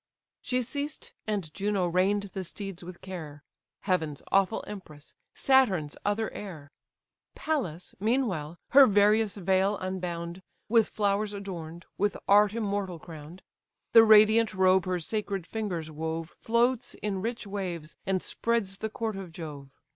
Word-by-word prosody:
She 250 0 0
ceased, 285 +4 -5
and 195 -8 -2
Juno 200 -2 0
rein'd 190 +3 +1
the 190 - -3
steeds 195 0 -7
with 175 0 -10
care: 155 -6 -8 0.4
(Heaven's 160 -7 -1
awful 195 +2 +2
empress, 155 -8 -10 0.2
Saturn's 200 - +3
other 210 +2 0
heir:) 160 -8 -8 0.6
Pallas, 185 - -3
meanwhile, 195 - 0
her 275 0 +8
various 210 0 +4
veil 190 +2 +2
unbound, 180 -2 -4 0.3
With 225 -1 +4
flowers 205 0 0
adorn'd, 170 -4 -7
with 205 +1 +1
art 205 +1 +5
immortal 200 -5 -2
crown'd; 160 +2 -11 0.5
The 225 -1 +10
radiant 215 0 +6
robe 185 -1 +4
her 180 -1 0
sacred 200 0 -3
fingers 175 -7 -4
wove 160 +1 -4
Floats 240 +2 0
in 200 -3 -3
rich 230 +2 -3
waves, 180 -6 -5
and 190 -1 0
spreads 215 -5 -1
the 220 - -2
court 220 -1 -3
of 190 -3 -7
Jove. 150 -4 -8
195 Hz, 135 wpm, -28 LUFS, 170-215 Hz, 0.6 s, The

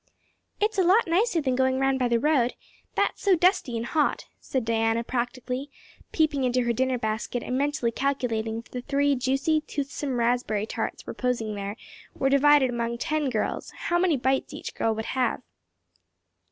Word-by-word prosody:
"It's 425 -1 +1
a - - +5
lot 385 +6 +5
nicer 355 +1 +2
than 260 -3 0
going 260 0 +2
round 270 0 +1
by 250 - +2
the 235 -1 +2
road; 255 -3 +2 0.4
that - - +2
is - - -18
so 390 -2 +4
dusty 350 - +2
and 230 - -3
hot," 300 +2 0
said 260 -4 -2
Diana 225 0 +1
practically, 250 +3 -3 0.4
peeping 310 -4 +1
into 250 0 +2
her 240 0 +1
dinner 260 +2 +1
basket 220 +2 -2
and 250 - -3
mentally 285 -3 0
calculating 230 -4 -1
if 230 - -10
the 250 - -4
three 285 +2 +1
juicy, 270 +4 +1
toothsome, 280 -3 -3
raspberry 235 -3 +1
tarts - - -4
reposing 235 -4 -2
there 200 0 -4 0.4
were 270 - +1
divided 280 -1 +5
among 235 0 -2
ten 305 +1 -1
girls 220 -4 -2 0.2
how 345 0 +3
many 350 -5 +3
bites 265 +1 0
each - - -7
girl 225 -1 0
would 220 0 -4
have. 260 -1 -1
260 Hz, 175 wpm, -26 LUFS, 235-290 Hz, 0.4 s, a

